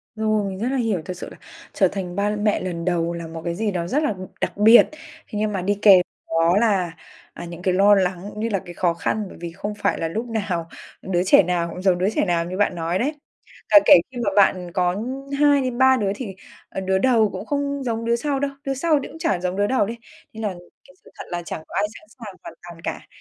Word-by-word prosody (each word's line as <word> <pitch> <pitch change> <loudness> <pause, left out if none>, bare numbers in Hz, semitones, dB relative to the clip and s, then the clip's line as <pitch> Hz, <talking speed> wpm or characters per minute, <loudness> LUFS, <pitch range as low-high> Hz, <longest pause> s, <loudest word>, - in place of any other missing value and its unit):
Rồi, 215 -2 0
mình 190 0 -7
rất 235 - -1
là 270 - 0
hiểu. 220 -8 0
Thật 185 -1 -6
sự - - -7
là - - -12 0.4
trở 190 - +3
thành 180 -2 -5
ba 205 +1 0
mẹ 210 0 +1
lần 170 -2 -4
đầu 170 -1 0
là 170 -1 -6
một 165 0 -8
cái 170 0 -2
gì 215 +1 -1
đó 170 -2 -3
rất 295 - 0
là 220 - +1 0.3
đặc - - -2
biệt. 220 +3 +7 0.4
Thế 210 - -4
nhưng 215 0 0
mà 190 - -2
đi 200 +2 0
kèm 190 -4 +8 0.3
đó 165 +3 +2
là, 195 -6 +2 0.4
à, 170 - -8
những 170 0 -9
cái 185 -1 +1
lo 200 +2 +5
lắng 185 -1 0
cũng 210 - -9
như 230 +2 -1
là 195 -3 0
cái 175 - -9
khó 170 -1 +1
khăn. 210 +5 -2
Bởi - - -12
vì 170 -1 -5
không 205 +4 -5
phải 205 - 0
là 165 - -1
lúc 225 +8 -4
nào 190 -7 -2 0.3
đứa 180 -1 0
trẻ 190 0 +6
nào 170 -1 -1
cũng 180 - -7
giống 185 -2 +3
đứa 185 +3 +1
trẻ - - +2
nào 170 -2 0
như 185 +2 -5
bạn 205 -3 +1
nói 170 +2 -1
đấy. 285 +6 0 0.6
Cả 305 - +9
kể - - +9 0.2
khi 250 - -9
mà 200 - +2
bạn 185 -3 +3
có 180 0 +1 0.4
2 290 -1 +5
đến 250 -2 -3
3 260 0 +5
đứa, 200 -3 0
thì, 200 -7 -6 0.3
ờ, 190 - -5
đứa 190 0 +1
đầu 225 -2 +3
cũng 205 - -7
không 280 -1 -2
giống 230 -1 -2
đứa 235 0 +2
sau 275 +2 -1
đâu, 280 0 -1
đứa 270 - -1
sau 300 +2 +2
thì - - -6
cũng 320 - -12
chả 195 - 0
giống 180 +1 -2
đứa 205 +1 +1
đầu 260 -4 +2
đi. 230 +3 -5 0.4
Nên 220 0 -7
là 210 - 0 0.4
cái 185 - -20
sự - - -18
thật - - -6
là 175 -1 -3
chẳng 160 - -6
có - - -10
ai 205 - +2
sẵn 315 - -22
sàng 205 -5 -9
hoàn - - -9
toàn 170 -1 -11
cả. - - -5
200 Hz, 265 wpm, -22 LUFS, 180-225 Hz, 0.6 s, Cả